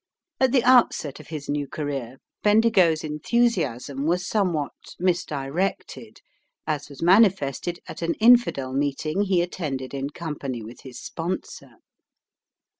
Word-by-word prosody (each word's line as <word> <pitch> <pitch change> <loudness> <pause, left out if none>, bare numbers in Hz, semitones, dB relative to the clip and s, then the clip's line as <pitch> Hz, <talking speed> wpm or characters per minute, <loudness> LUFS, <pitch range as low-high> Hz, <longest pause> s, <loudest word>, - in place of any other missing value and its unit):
At 260 -2 +3
the 255 -3 +3
outset 240 - +3
of 155 - -13
his 150 -3 -6
new 145 -1 -2
career 135 -4 -5 0.2
Bendigo's 210 -7 +4
enthusiasm 150 - 0
was 180 +2 0
somewhat 175 -9 0 0.3
misdirected, 175 -1 -2 0.4
as 150 -2 -3
was 140 +2 -8
manifested 175 - +3
at - - -8
an 165 0 0
infidel 225 - +4
meeting 145 +6 -1
he 190 -4 +2
attended 140 -7 -4
in 140 0 -3
company 145 -6 -5
with 115 +3 -11
his 130 -2 -10
sponsor. 175 +3 -5
155 Hz, 120 wpm, -24 LUFS, 140-190 Hz, 0.4 s, Bendigo's